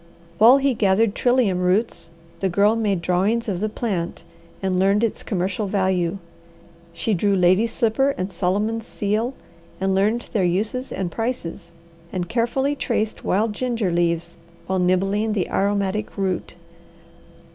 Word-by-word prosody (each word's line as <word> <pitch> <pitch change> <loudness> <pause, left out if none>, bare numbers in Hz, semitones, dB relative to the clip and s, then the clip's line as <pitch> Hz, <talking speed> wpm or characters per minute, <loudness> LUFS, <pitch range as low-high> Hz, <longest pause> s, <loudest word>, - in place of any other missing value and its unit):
While 235 +5 +8
he 275 -1 +2
gathered 205 0 +2
trillium 245 -8 +2
roots 180 0 0 0.3
the 190 - 0
Girl 205 +4 +3
made 205 -6 0
drawings 200 +7 +1
of 190 -4 -2
the 215 +2 -1
plant 190 -8 -3 0.4
and 190 -1 0
learned 200 +3 +3
its 230 - -1
commercial 195 +1 -2
value. 190 -2 0 0.7
She 170 +6 -1
drew 200 +2 +2
lady's 185 +5 +3
slipper 270 +4 +1
and 185 +2 -3
Solomon's 210 +6 -1
seal, 215 +5 -1 0.4
and 190 0 +1
learned 210 +5 0
their 205 - +2
uses 210 +9 -1
and 185 -3 -3
prices; 195 -6 -4 0.4
and 180 -2 -3
carefully 250 +5 0
traced 220 -5 -2
wild 210 +3 +1
ginger 230 -5 -1
leaves 170 -1 -1 0.3
while 190 0 -1
nibbling 195 +4 +1
the 195 -4 -1
aromatic 200 +1 -1
root. 190 -3 -2
200 Hz, 140 wpm, -22 LUFS, 185-225 Hz, 0.7 s, While